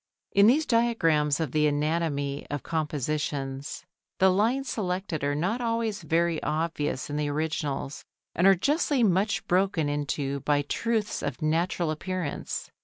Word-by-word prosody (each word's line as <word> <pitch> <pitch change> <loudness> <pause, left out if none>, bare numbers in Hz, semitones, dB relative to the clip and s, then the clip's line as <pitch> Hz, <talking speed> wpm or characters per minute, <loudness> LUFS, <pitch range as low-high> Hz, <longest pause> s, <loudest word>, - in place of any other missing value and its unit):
In 200 +1 +6
these 295 +7 +4
diagrams 165 - +2
of 160 -6 -1
the 150 +1 +3
anatomy 145 -1 -1
of 145 -3 -4
compositions 145 -3 -3 0.3
the 190 0 +5
lines 235 +8 +1
selected 180 - -2
are 145 0 +1
not 190 +11 -1
always 230 -3 -1
very 165 +1 +1
obvious 155 -4 -2
in 145 - -3
the 150 -1 0
originals 150 -2 -2 0.3
and 180 +3 +3
are 195 - +7
justly 285 - +1
much 200 +1 +2
broken 180 -4 +1
into 145 -1 -2
by 145 +1 +1
truths 220 +7 -1
of - - -4
natural 165 +1 +1
appearance. 175 0 -4
160 Hz, 140 wpm, -27 LUFS, 145-195 Hz, 0.3 s, are